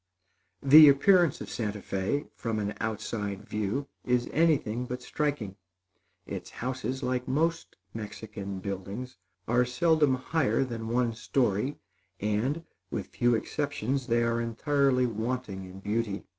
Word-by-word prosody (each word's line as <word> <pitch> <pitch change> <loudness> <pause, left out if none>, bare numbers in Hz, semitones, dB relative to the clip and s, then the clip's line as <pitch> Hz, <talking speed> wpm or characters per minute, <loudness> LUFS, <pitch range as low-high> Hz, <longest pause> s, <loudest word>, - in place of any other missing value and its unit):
The 150 +2 +10
appearance 175 +3 +4
of - - -6
Santa 105 -3 -2
Fé, 100 +9 -2
from 115 -2 -3
an 105 0 -2
outside 105 -2 -3
view, 110 +7 -2 0.2
is 125 -1 +1
anything 135 -7 +2
but 125 0 -5
striking. 130 -10 -2 0.7
Its - - -6
houses, 130 +1 -4
like 125 0 -1
most 165 +5 0 0.2
Mexican 105 -2 -6
buildings, 100 +5 -5 0.3
are 120 +2 +4
seldom 150 +2 +3
higher 135 +1 +1
than 115 -3 -5
one 120 0 +1
story, 120 +1 0 0.4
and, 110 +10 0 0.3
with - - -4
few 120 -1 +2
exceptions, 135 0 -2
they 120 -1 +2
are 115 0 +1
entirely 130 +2 +2
wanting 115 -3 -3
in 95 +1 -10
beauty. 105 -1 -1
120 Hz, 130 wpm, -29 LUFS, 105-135 Hz, 0.7 s, The